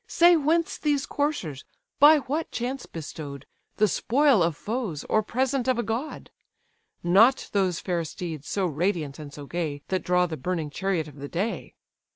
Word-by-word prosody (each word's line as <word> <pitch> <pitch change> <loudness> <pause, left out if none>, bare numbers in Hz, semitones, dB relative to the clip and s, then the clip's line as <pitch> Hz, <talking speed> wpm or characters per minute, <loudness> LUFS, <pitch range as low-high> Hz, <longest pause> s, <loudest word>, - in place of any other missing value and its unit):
Say 345 +1 +6
whence 320 +2 +1
these 290 -3 +1
coursers? 240 - -2 0.4
by 300 +2 +8
what 300 +5 -3
chance 255 +2 -4
bestow'd, 145 -3 -8 0.3
The 215 - +4
spoil 260 - +3
of 165 -3 +1
foes, 215 - -3
or 215 - +2
present 255 +3 -1
of 255 -2 +2
a 240 - 0
god? 235 +8 -4 0.7
Not 215 +10 +4
those 185 -4 +1
fair 175 -3 -1
steeds, 160 -2 -6
so 195 -2 0
radiant 160 -3 -1
and 150 -2 -8
so 145 0 -9
gay, 150 -3 -3
That 185 -1 0
draw 180 +1 +2
the 165 -3 -5
burning 160 +1 -3
chariot 180 -2 -1
of 145 -1 -13
the 140 +1 -6
day. 200 +7 -3
185 Hz, 170 wpm, -26 LUFS, 160-260 Hz, 0.7 s, by